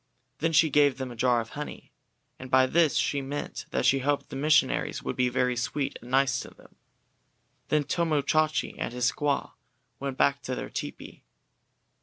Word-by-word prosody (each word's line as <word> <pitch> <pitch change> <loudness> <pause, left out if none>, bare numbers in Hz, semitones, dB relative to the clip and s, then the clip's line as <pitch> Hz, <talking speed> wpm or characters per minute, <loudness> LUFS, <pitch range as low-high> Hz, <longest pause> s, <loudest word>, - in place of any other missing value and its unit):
Then 165 +1 +1
she 160 -1 +4
gave 145 -2 +4
them 130 -2 -5
a - - -9
jar 120 0 +2
of 115 - -9
honey, 150 0 -8 0.5
and 130 - -8
by 130 0 +5
this 155 +1 +3
she 140 - +1
meant 140 +2 -5
that - - -1
she 135 +2 +4
hoped 145 +2 -1
the - - -7
missionaries 150 +3 +2
would - - -3
be 125 -1 +2
very 125 0 +1
sweet 135 +4 -2
and 120 - -12
nice 135 -1 +2
to - - -7
them. - - -20 0.9
Then 150 -1 +2
Tomo 155 0 0
Chachi 155 +2 +1
and - - -2
his 125 0 +2
squaw 145 -1 -1 0.5
went 135 -1 -4
back 140 0 +2
to 130 +1 -4
their - - -6
tepee. - - -7
135 Hz, 185 wpm, -27 LUFS, 130-150 Hz, 0.9 s, by